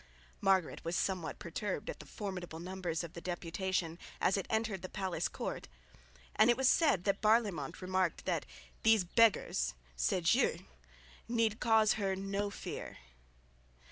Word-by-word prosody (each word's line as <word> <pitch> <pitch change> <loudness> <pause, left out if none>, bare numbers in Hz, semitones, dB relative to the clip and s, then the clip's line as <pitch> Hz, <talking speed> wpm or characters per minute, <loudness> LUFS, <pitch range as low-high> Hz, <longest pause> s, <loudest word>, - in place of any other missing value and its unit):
Margaret 190 -4 +2
was 165 +1 -2
somewhat 180 -4 -1
perturbed 185 +4 -4
at - - -5
the - - -11
formidable 185 -5 -5
numbers 175 -2 -3
of 170 - -8
the 170 - -8
deputation, 175 -1 -2 0.2
as 185 - +3
it 195 - -2
entered 220 -4 0
the 185 - -6
palace 190 -2 -2
court, - - -5 0.7
and 215 +2 +6
it 240 - +4
was 265 -1 +3
said 280 - +4
that 200 0 0
Barlaymont 210 - +2
remarked 185 -1 0
that - - -1 0.3
"these 220 -3 +5
beggars" 220 - +3 0.2
(ces - - 0
gueux) - - +1 0.6
need 230 -2 +1
cause 220 -2 +4
her 195 -1 +1
no 195 +1 -2
fear. 200 - -6
190 Hz, 145 wpm, -34 LUFS, 175-215 Hz, 0.7 s, and